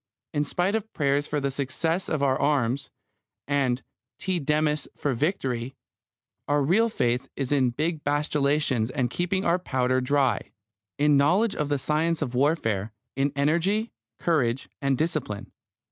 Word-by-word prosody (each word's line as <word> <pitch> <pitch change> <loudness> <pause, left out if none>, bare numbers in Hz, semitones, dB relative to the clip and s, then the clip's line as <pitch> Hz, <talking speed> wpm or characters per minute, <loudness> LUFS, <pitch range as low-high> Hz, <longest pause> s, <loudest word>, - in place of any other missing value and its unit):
In 145 0 +1
spite 180 +6 0
of 220 0 -2
prayers 145 0 +1
for 150 - -1
the 140 -1 -1
success 160 +6 -1
of 150 -3 0
our 135 -2 +3
arms, 140 -2 +1 0.6
and 135 -3 +1 0.3
Te 185 -2 0
Deums 150 0 +1
for 145 - -1
victory, 130 -4 -1 0.7
our 145 0 +2
real 210 +11 +3
faith 125 - 0
is 135 -1 -3
in 135 -3 +3
big 155 +5 -2
battalions 145 -4 +1
and 130 -3 -1
keeping 180 +4 -1
our 170 +2 +3
powder 130 -5 0
dry; 130 -3 +1 0.4
in 145 0 +4
knowledge 185 +10 +3
of 150 -1 -1
the 145 - +2
science 155 +3 +1
of 125 -3 -5
warfare; 115 - +1 0.2
in 135 +2 +1
energy, 170 +10 +1 0.3
courage, 135 -7 +1
and 140 -2 +1
discipline. 155 -10 -2
145 Hz, 145 wpm, -26 LUFS, 130-160 Hz, 0.7 s, in